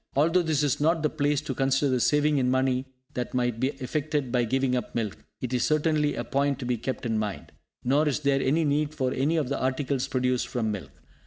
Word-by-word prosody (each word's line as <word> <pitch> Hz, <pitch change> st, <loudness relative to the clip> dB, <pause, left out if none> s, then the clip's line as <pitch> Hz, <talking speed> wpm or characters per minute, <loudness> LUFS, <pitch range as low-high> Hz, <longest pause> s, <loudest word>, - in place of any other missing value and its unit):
Although 165 Hz, +6 st, +4 dB
this 155 Hz, -3 st, +1 dB
is 145 Hz, -1 st, 0 dB
not 160 Hz, +1 st, +2 dB
the 150 Hz, -, +1 dB
place 145 Hz, -2 st, +1 dB
to 140 Hz, -, -4 dB
consider 135 Hz, +1 st, +1 dB
the 130 Hz, -, +2 dB
saving 150 Hz, +3 st, +3 dB
in 125 Hz, -1 st, +2 dB
money 130 Hz, 0 st, +1 dB, 0.3 s
that 125 Hz, 0 st, -4 dB
might 120 Hz, -2 st, 0 dB
be 130 Hz, -, +2 dB
effected 145 Hz, 0 st, -2 dB
by 120 Hz, -1 st, +2 dB
giving 130 Hz, +2 st, +1 dB
up 125 Hz, -3 st, -4 dB
milk, 110 Hz, -4 st, -2 dB, 0.2 s
it 125 Hz, 0 st, -3 dB
is 125 Hz, -, +1 dB
certainly 155 Hz, -1 st, +2 dB
a 120 Hz, -, -2 dB
point 140 Hz, +3 st, 0 dB
to 130 Hz, -, -6 dB
be 125 Hz, 0 st, +1 dB
kept 130 Hz, +2 st, -4 dB
in 110 Hz, -2 st, 0 dB
mind. 105 Hz, -3 st, -4 dB, 0.3 s
Nor 145 Hz, +5 st, +3 dB
is 150 Hz, +1 st, 0 dB
there 140 Hz, -2 st, +2 dB
any 155 Hz, +6 st, +2 dB
need 150 Hz, +1 st, 0 dB
for 130 Hz, -3 st, 0 dB
any 150 Hz, +6 st, +1 dB
of 145 Hz, -5 st, 0 dB
the 140 Hz, -, -2 dB
articles 130 Hz, 0 st, 0 dB
produced 125 Hz, -1 st, 0 dB
from 115 Hz, -3 st, -1 dB
milk. 95 Hz, -9 st, -5 dB
135 Hz, 230 wpm, -27 LUFS, 125-150 Hz, 0.3 s, Although